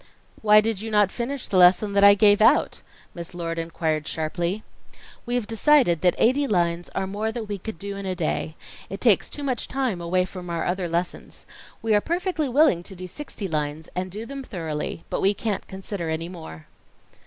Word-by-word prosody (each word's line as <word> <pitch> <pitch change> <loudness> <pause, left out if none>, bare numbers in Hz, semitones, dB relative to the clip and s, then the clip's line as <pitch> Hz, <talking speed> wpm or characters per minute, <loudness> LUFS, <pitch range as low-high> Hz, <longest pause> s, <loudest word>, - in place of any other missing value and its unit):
"Why 210 0 +6
did 220 -2 -2
you 225 - -5
not 210 -3 +3
finish 255 +2 -3
the 190 - 0
lesson 185 +3 +5
that 200 0 +3
I 200 0 +9
gave 205 0 +5
out?" 220 - +4 0.3
Miss 175 +1 -8
Lord 165 -1 -3
inquired 160 -2 -2
sharply. 170 +6 -2 0.6
"We 245 - -1
have 245 -3 0
decided 225 - +3
that 180 -1 +3
eighty 275 +5 +3
lines 175 -4 0
are 195 - 0
more 210 +3 -2
than 230 -1 -5
we 205 -1 -5
can 220 +4 -6
do 200 +4 -6
in 200 -1 -6
a 185 - -2
day. 160 -2 -2 0.3
It 195 - -6
takes 225 -6 +3
too 290 - -6
much 255 -4 -1
time 255 -9 -2
away 180 +2 +1
from 180 -1 -9
our 170 -1 -2
other 180 -1 -1
lessons. 170 +2 -4 0.4
We 225 -1 +2
are 205 - +4
perfectly 340 - -1
willing 270 - +4
to 190 +2 -9
do 185 0 -7
sixty 205 - -5
lines, 155 -1 -3
and 185 +1 -2
do 210 +5 -6
them 275 +2 -7
thoroughly, 165 -7 -5
but - - -1
we 200 +2 +3
can't 210 0 -3
consider 190 -3 -5
any 160 +2 -3
more." 160 - -10
195 Hz, 200 wpm, -24 LUFS, 170-220 Hz, 0.6 s, I